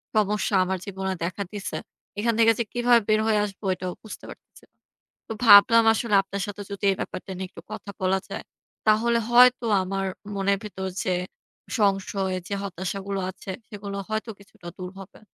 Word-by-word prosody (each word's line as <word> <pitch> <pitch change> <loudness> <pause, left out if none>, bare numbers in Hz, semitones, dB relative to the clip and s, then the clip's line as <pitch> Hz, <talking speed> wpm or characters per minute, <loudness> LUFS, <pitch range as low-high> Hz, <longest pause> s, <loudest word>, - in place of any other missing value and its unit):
সমস্যা 210 -1 +1
আমার 190 +1 -1
জীবনে 190 -1 -3
দেখা 185 +4 -2
দিছে, 205 -1 -4 0.4
এখান 230 +2 +1
থেকে 225 0 +7
যে - - +2
কিভাবে 240 -1 +4
বের 215 0 +4
হয়ে 215 -1 +3
আসবো 200 0 -9
এটাও 180 0 -5
বুঝতে 220 - -9
পারতেছি - - -14
না। - - -52 0.5
তো - - -8
ভাবলাম 230 +2 +9
আসলে 220 -1 0
আপনার 195 +1 -5
সাথে 205 0 -6
যদি 200 +1 -7
এই - - -1
ব্যাপারটা 190 - -6
নিয়ে 190 0 -4
একটু - - -12
কথা - - -7
বলা 190 +1 +2
যায় - - -5 0.4
তাহলে 230 +2 +4
হয়তো 245 0 +6 0.2
আমার 195 +1 -2 0.3
মনের 200 0 +1
ভেতর 190 -2 -5 0.2
যে 185 - 0 0.7
সংশয় 195 -2 +1
যে - - -4
হতাশাগুলো 195 +1 -4
আছে 190 - -8 0.2
সেগুলো 200 -1 -7
হয়তো 220 +1 -2
কিছুটা 195 -3 -15
দূর 180 -1 -6
হবে। 195 0 -12
200 Hz, 170 wpm, -25 LUFS, 190-215 Hz, 0.7 s, ভাবলাম